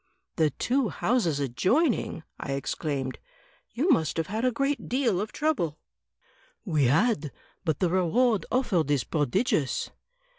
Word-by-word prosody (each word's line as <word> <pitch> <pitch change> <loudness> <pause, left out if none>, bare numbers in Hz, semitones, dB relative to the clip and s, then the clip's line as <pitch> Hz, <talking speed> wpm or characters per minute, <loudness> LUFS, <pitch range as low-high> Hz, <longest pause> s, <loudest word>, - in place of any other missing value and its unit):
"The 155 -2 +4
two 250 - 0
houses 195 - 0
adjoining!" 185 - +1 0.2
I 140 - -3
exclaimed; 135 -1 -3 0.5
"you 310 +9 +1
must 160 - +2
have 165 - 0
had 215 +7 -3
a 255 - +3
great 275 +4 -1
deal 240 -7 +1
of 210 - -4
trouble." 260 - -1 0.9
"We 155 -8 +2
had; 155 - +2 0.3
but 160 -6 0
the 180 - +1
reward 210 +5 +2
offered 200 - +1
is 145 -3 +2
prodigious." 150 - 0
185 Hz, 135 wpm, -27 LUFS, 150-250 Hz, 0.9 s, The